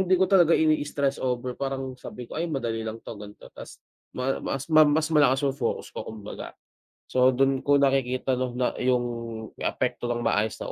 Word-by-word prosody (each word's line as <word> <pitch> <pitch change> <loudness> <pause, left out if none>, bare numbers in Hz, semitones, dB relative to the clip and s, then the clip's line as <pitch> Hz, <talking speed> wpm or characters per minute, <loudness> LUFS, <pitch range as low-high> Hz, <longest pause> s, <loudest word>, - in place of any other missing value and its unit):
hindi 185 0 +3
ko 190 - +4
talaga 175 -4 +5
ini-stress 145 -3 +1
over, 125 0 -2
parang 135 0 -4
sabi 125 - -8
ko, 155 - -6
"Ay 170 - -1
madali 120 -6 -2
lang 110 0 -4
'to." 105 -3 -8
gan'to. 105 0 -12
Ta's - - -11 0.4
maa 130 +1 -1
mas 135 0 -3
ma 155 0 +8
mas 155 +1 +2
malakas 145 -2 +4
'yung 135 - +2
focus - - -2
ko - - -6
kumbaga. 105 -2 -8 0.6
So 130 0 +4
do'n 135 0 +2
ko 145 - +2
nakikita 130 -1 +1
nung 125 -1 -2
na 125 0 +1
'yung 125 -1 +2 0.6
apekto 120 - -2
ng 120 0 -2
maayos 105 0 +1
na - - -5
130 Hz, 190 wpm, -26 LUFS, 120-145 Hz, 0.6 s, ma